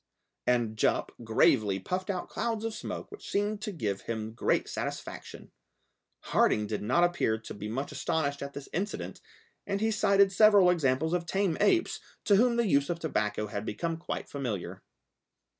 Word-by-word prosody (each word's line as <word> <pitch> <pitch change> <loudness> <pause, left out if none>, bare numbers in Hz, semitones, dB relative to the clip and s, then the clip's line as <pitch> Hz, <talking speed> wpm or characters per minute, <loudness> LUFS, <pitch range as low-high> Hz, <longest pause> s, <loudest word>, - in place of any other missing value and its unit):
And 120 -3 +1
Jup - - +1
gravely 110 -3 +3
puffed 185 - -3
out 185 -2 -2
clouds 225 -2 -2
of 225 - -2
smoke - - -6
which 415 - -10
seemed 205 +1 0
to 215 - -3
give 105 - -3
him 110 -1 -4
great 115 - +1
satisfaction. - - -6 0.7
Harding 105 - +2
did 105 0 -3
not 130 +11 +2
appear 175 -11 +2
to 110 - -9
be 105 +1 -6
much 130 +7 -3
astonished 145 0 -1
at 140 0 -5
this 140 - -8
incident, 200 +5 -3 0.5
and 200 0 -1
he 220 +1 +1
cited 200 -2 +4
several 200 -2 +6
examples 160 -1 +1
of 175 -1 -1
tame 195 -3 +1
apes, 355 -3 +2 0.3
to 205 - +5
whom 240 +2 +4
the 235 0 +2
use 140 -7 +2
of 170 - -1
tobacco 105 -10 -1
had 100 0 -4
become 165 +11 -2
quite 165 - -5
familiar. 120 -10 -4
160 Hz, 170 wpm, -29 LUFS, -, 0.7 s, several